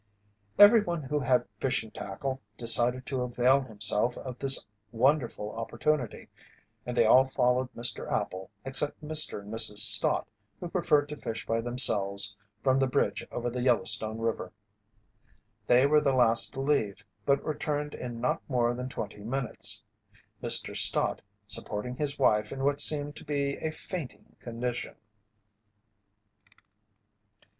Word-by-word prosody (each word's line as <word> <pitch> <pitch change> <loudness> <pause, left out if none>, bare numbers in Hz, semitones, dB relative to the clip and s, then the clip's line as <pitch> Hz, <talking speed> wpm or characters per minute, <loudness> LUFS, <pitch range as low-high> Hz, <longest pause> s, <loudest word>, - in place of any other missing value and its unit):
Everyone 205 -6 +5
who 150 +3 -2
had 125 -2 0
fishing 110 -4 -2
tackle 130 +7 -6 0.2
decided 120 +2 +2
to 130 -2 -4
avail 125 +2 +1
himself 115 0 -2
of 130 -2 -9
this 135 -1 +5 0.3
wonderful 120 -3 -1
opportunity, 120 +3 -3 0.6
and 125 0 -5
they 115 - +4
all 130 +4 +5
followed 125 -1 0
Mr. 120 +1 -2
Appel 95 0 -4 0.2
except 135 +2 +1
Mr. 155 -7 +2
and 105 +2 -10
Mrs. 110 -2 +2
Stott, 105 - +5 0.3
who 175 - -7
preferred 165 -5 +1
to 150 - -7
fish 115 -5 -6
by 115 0 -1
themselves 100 -4 +5 0.3
from 130 0 +2
the 135 - +1
bridge 125 - -1
over 120 0 -4
the 125 +1 -4
Yellowstone 115 -3 +1
river. 115 -5 -4 1.2
They 125 +2 +4
were 150 +1 +3
the 140 -2 0
last 115 -3 +2
to 135 - -5
leave 110 -8 -1 0.2
but 140 0 0
returned 150 -1 -4
in 120 -2 -7
not 125 - -2
more 120 -2 0
than 125 +1 -6
twenty 105 -5 -8
minutes, 125 +1 -2 0.6
Mr. - - +1
Stott - - +2 0.2
supporting 105 +4 -3
his 145 +1 -4
wife 105 -5 +1
in 135 0 -6
what 145 +1 +1
seemed 145 -1 +2
to - - -10
be 140 -2 -2
a 160 - -4
fainting 160 -3 -8
condition. 120 +1 -6
125 Hz, 140 wpm, -27 LUFS, 115-140 Hz, 1.2 s, Everyone